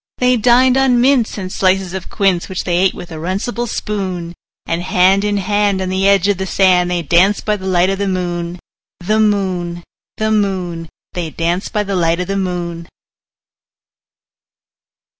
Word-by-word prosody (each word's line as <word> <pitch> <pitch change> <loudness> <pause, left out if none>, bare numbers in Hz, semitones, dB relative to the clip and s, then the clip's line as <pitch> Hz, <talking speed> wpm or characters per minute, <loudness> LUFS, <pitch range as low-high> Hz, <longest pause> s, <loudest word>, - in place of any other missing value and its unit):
They 250 0 +3
dined 250 +3 +4
on 260 -2 +3
mince 250 -3 +2
and 185 -2 -5
slices 190 -1 +1
of 190 -1 -6
quince, 190 -3 0
Which 185 - -3
they 175 - -1
ate 190 +1 +2
with 175 - -9
a 160 - -6
runcible 200 +8 -3
spoon; 185 -6 -4 0.3
And 165 +1 -2
hand 185 +1 +3
in 205 0 0
hand, 205 0 +1
on 190 -1 -2
the 190 +1 +1
edge 200 -1 +3
of 200 -2 +1
the 190 - -3
sand, 180 -2 +3
They 175 -1 -1
danced 180 +7 +2
by 210 - +1
the 190 -2 -7
light 185 0 +2
of 195 - -3
the 200 - -1
moon, 175 -2 -3 0.4
The 215 +5 0
moon, 185 -5 0 0.3
The 215 0 0
moon, 185 -6 -1 0.2
They 175 -3 -3
danced 170 +4 -2
by 210 -2 0
the 200 -1 -3
light 170 -1 +1
of 180 - -1
the 195 +2 -3
moon. 175 -3 -3
190 Hz, 180 wpm, -16 LUFS, 175-205 Hz, 0.4 s, dined